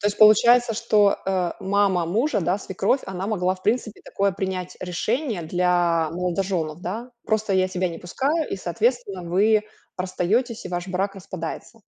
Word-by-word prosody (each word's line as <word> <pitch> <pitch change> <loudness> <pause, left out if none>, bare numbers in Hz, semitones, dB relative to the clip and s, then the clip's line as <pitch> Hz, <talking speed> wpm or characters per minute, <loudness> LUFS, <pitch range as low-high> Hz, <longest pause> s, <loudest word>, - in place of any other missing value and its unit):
То 205 - +2
есть, 205 - -5
получается, 235 +2 +6
что, 210 -2 +3
э, 185 -3 0
мама 195 -3 +2
мужа, 225 - +1
да, 180 +3 0
свекровь, 195 +7 0
она 190 0 -4
могла, 185 -4 0
в 185 - -18
принципе, 220 0 -1
такое 200 0 0
принять 185 -1 -4
решение 215 - -2
для 175 -1 +1
молодожёнов, 175 -2 -2
да? 225 +8 -5
Просто 215 -2 0
я 185 0 +3
тебя 185 0 -1
не 165 -1 -7
пускаю, 285 - -1
и, - - -2
соответственно, 200 +2 -1
вы 205 +5 +3 0.3
расстаётесь, 205 +6 -1
и - - -5
ваш 175 +1 -4
брак 195 +2 -1
распадается. 185 +4 -7
190 Hz, 160 wpm, -23 LUFS, 180-215 Hz, 0.3 s, получается